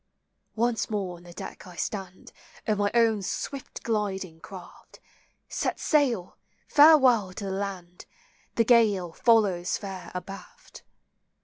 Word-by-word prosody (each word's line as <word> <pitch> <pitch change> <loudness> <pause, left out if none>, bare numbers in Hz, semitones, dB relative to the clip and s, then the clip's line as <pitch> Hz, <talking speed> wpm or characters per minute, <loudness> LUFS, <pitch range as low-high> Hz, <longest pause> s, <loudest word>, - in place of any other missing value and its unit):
Once 235 0 0
more 195 -5 -3
on - - -16
the 175 0 -13
deck 175 - -9
I 180 - -12
stand, 190 +1 -5 0.3
Of 210 -2 0
my 205 0 +2
own 225 -3 +3
swift 270 +7 -5
gliding 195 -6 -2
craft: 185 +1 -13 0.5
Set - - -2
sail! 250 - +1 0.3
farewell 265 -10 +6
to 205 - -7
the 195 - -3
land; 190 -3 -6 0.5
The 230 - +3
gale 210 -7 +3
follows 200 -4 +2
fair 195 -3 -8
abaft. 195 +2 -9
200 Hz, 125 wpm, -27 LUFS, 185-230 Hz, 0.5 s, farewell